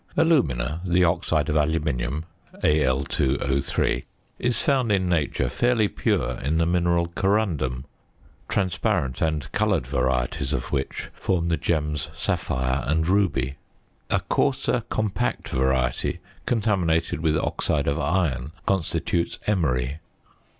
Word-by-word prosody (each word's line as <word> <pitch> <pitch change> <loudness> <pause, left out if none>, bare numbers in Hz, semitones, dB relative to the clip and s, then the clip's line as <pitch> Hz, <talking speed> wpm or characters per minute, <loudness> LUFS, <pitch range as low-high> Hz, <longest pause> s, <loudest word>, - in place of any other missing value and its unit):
Alumina, 85 - +2
the 90 0 +3
oxide 85 -3 +1
of 75 - 0
aluminium 75 -2 0 0.4
(Al_O_), 70 -1 +1 0.4
is 125 -1 0
found 135 -7 +2
in 95 -2 +2
nature 75 -6 +1
fairly 120 - +2
pure 65 -9 -1
in 75 +4 0
the 85 - +3
mineral 85 0 +2
corundum; 85 -10 0 0.6
transparent 90 - 0
and 80 -3 -1
coloured - - +1
varieties 65 +1 0
of - - -3
which 70 -2 -3
form 85 -3 -1
the 85 - +3
gems 75 -2 -1
sapphire 65 +1 -1
and 80 +2 +1
ruby. 70 -9 +1 0.5
A - - +2
coarser 130 -3 +1
compact 100 - -1
variety 65 -1 +1 0.3
contaminated 95 -10 +1
with 80 -2 +2
oxide 75 -1 0
of 70 - +1
iron 75 -3 0
constitutes 85 -2 0
emery. 70 -8 0
80 Hz, 115 wpm, -24 LUFS, 65-95 Hz, 0.6 s, the